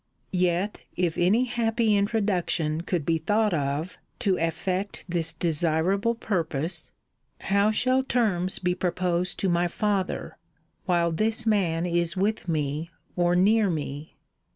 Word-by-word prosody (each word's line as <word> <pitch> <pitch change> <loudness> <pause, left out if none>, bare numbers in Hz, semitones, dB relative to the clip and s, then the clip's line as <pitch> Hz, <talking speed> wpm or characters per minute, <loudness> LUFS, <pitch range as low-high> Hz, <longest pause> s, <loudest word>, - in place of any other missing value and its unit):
Yet 180 +2 0
if 175 -3 0
any 195 +8 +3
happy 230 -3 +1
introduction 195 -7 +1
could 175 -3 -2
be 165 0 +1
thought 210 +2 +1
of 145 +3 -2 0.2
to 195 -2 +1
effect 180 +4 -2
this 170 -2 0
desirable 170 +7 +1
purpose, 165 -6 -2 0.5
how 200 +2 +2
shall 255 +4 +2
terms 210 -8 0
be 180 -1 0
proposed 180 0 -1
to 195 - +1
my 175 0 +2
father, 195 +1 -2 0.5
while 170 -2 +2
this 220 +7 0
man 180 -6 +1
is 170 0 0
with 205 +1 0
me, 155 0 -1 0.3
or 175 0 +2
near 205 +3 +4
me? 150 -2 -5
180 Hz, 130 wpm, -26 LUFS, 165-205 Hz, 0.5 s, near